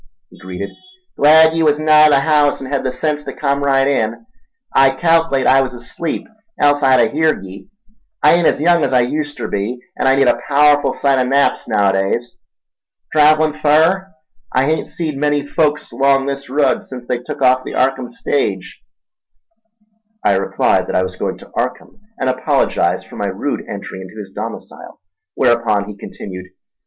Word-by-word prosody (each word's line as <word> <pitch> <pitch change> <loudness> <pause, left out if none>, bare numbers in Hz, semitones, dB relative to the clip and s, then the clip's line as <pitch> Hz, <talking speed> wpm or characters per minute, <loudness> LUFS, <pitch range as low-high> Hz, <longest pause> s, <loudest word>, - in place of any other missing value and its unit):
he - - -18
greeted. 95 +2 -7 0.4
"Glad 160 +2 +5
ye 165 - 0
was 150 -2 +3
nigh 155 0 +5
the 140 -2 +3
haouse 150 -1 +2
en' 135 0 -8
hed 140 - -1
the 130 - -1
sense 150 +3 -2
ta - - -7
come 140 -1 0
right 135 -1 +2
in. 115 - -1 0.5
I 135 0 +6
calc'late 165 -1 +1
I 135 +2 +5
was 130 -2 -4
asleep, 135 +7 -5 0.3
else 145 0 +3
I'd 130 -1 +4
a - - +2
heerd 155 -8 0
ye—I 205 - -3
ain't 170 -1 +3
as - - +1
young 170 +1 +3
as 130 - 0
I 125 -1 +4
uster 145 +2 -4
be, 105 +5 -3 0.2
an' - - -1
I 135 - +4
need 135 -1 +3
a 120 - +2
paowerful 145 0 +3
sight 135 -2 +1
o' - - +2
naps 135 +2 +1
naowadays. 100 +2 0 0.8
Trav'lin' 155 0 +4
fur? 160 +6 +3 0.4
I 130 +1 +1
hain't 160 +2 -1
seed 155 -4 -5
many 145 -1 0
folks 150 0 -1
'long 135 0 +2
this 140 -1 -5
rud 145 +2 +1
sence 125 -2 -10
they 120 0 -2
tuk 140 +2 -6
off 130 0 +3
the - - -7
Arkham 130 -1 0
stage." 100 -8 -3 1.4
I 100 - +3
replied 95 - 0
that - - -4
I 90 - +2
was 95 - -5
going - - -4
to - - -16
Arkham, - - -4 0.2
and 130 - -1
apologised 130 0 0
for - - -12
my - - -2
rude - - -3
entry 95 - -7
into 95 +3 -12
his 100 -3 -9
domicile, - - -8 0.4
whereupon 115 -5 +1
he 105 - -8
continued. 90 -2 -9
140 Hz, 175 wpm, -17 LUFS, 125-150 Hz, 1.4 s, I